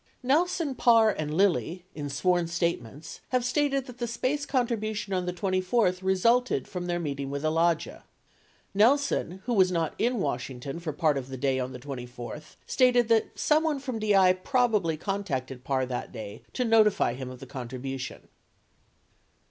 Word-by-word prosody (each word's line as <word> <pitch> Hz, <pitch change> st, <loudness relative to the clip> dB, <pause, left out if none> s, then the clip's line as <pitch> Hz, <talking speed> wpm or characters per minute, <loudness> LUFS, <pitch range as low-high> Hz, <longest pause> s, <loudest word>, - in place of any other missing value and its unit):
70 -, -, -9 dB
Kelson, 335 Hz, -3 st, 0 dB
Parr, 230 Hz, -3 st, +5 dB
and 155 Hz, -5 st, -4 dB
Lilly, 180 Hz, 0 st, +1 dB
in 145 Hz, -2 st, -5 dB
sworn 170 Hz, +5 st, +1 dB
statements, 165 Hz, -5 st, -3 dB
have 250 Hz, -1 st, +1 dB
stated 275 Hz, 0 st, +1 dB
that 250 Hz, -1 st, -12 dB
the 240 Hz, -, -2 dB
SPACE 260 Hz, +5 st, -2 dB
contribution 220 Hz, -6 st, -1 dB
on 180 Hz, -1 st, -1 dB
the -, -, 0 dB
24th 185 Hz, +1 st, 0 dB
resulted 230 Hz, +7 st, +2 dB
from 180 Hz, -2 st, -5 dB
their 175 Hz, 0 st, 0 dB
meeting 140 Hz, -4 st, -3 dB
with 140 Hz, +1 st, -4 dB
Alagia. 165 Hz, +1 st, +1 dB
71 -, -, -29 dB, 0.7 s
Nelson, 240 Hz, -, +3 dB
who 245 Hz, -, 0 dB
was 190 Hz, -4 st, +4 dB
not 165 Hz, -3 st, 0 dB
in 245 Hz, +2 st, +1 dB
Washington 135 Hz, -, -3 dB
for 170 Hz, -2 st, -4 dB
part 150 Hz, -1 st, +1 dB
of 130 Hz, -, -8 dB
the 130 Hz, -, -6 dB
day 135 Hz, 0 st, 0 dB
on 130 Hz, 0 st, -3 dB
the 125 Hz, -, -8 dB
24th, 125 Hz, +2 st, -8 dB
stated 245 Hz, -3 st, +3 dB
that 225 Hz, -1 st, +2 dB
someone 310 Hz, -1 st, +2 dB
from 255 Hz, -4 st, -4 dB
DI 195 Hz, -4 st, +5 dB
probably 210 Hz, -, +1 dB
contacted 140 Hz, -10 st, -3 dB
Parr 130 Hz, -1 st, 0 dB
that 125 Hz, -1 st, -5 dB
day 110 Hz, -3 st, -8 dB
to 250 Hz, -, 0 dB
notify 215 Hz, -, +4 dB
him 130 Hz, 0 st, -6 dB
of 130 Hz, -1 st, -10 dB
the 135 Hz, -, -9 dB
contribution. 130 Hz, +1 st, -6 dB
180 Hz, 165 wpm, -27 LUFS, 140-235 Hz, 0.7 s, Parr